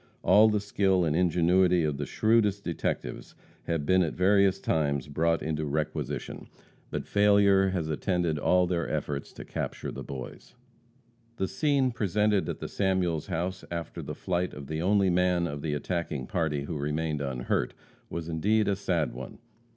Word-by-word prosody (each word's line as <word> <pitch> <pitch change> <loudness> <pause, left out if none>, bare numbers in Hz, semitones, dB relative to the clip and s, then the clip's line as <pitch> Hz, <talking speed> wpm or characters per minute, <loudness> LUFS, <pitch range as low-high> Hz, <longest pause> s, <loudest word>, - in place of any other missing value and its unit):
All 105 +4 +6
the 105 -1 +1
skill 95 -3 +1
and 75 -1 0
ingenuity 90 +1 +3
of 75 -2 -1
the 70 -1 -4
shrewdest 110 -3 +2
detectives 80 -7 -4 0.3
have 80 -4 -1
been 95 +3 +4
at 85 -4 -1
various 95 +1 +3
times 70 -7 0
brought 80 +2 0
into 80 0 -2
requisition, 75 +1 -3 0.4
but - - -4
failure 100 -1 +4
has 90 -4 -2
attended 85 0 0
all 90 +4 +3
their 85 -2 -1
efforts 70 -1 -3
to - - -9
capture - - -4
the - - -7
boys. 65 -2 -8 0.8
The 95 -4 -1
scene 135 +5 +1
presented 105 -1 +1
at - - -3
the - - -5
Samuels 90 -5 0
house, 90 +1 -3
after 85 -2 -5
the - - -6
flight 90 0 -2
of 70 - -8
the 80 +3 -3
only 100 +1 +3
man 90 -1 +2
of 75 -3 -4
the 75 -1 -2
attacking 75 -3 -3
party 75 -4 -1
who 75 +1 -4
remained 75 +1 -2
unhurt, 65 -3 -2 0.3
was 85 -1 -5
indeed 105 +7 +1
a 100 - +2
sad 90 -5 -1
one. 65 +1 -8
85 Hz, 165 wpm, -28 LUFS, 75-95 Hz, 0.8 s, All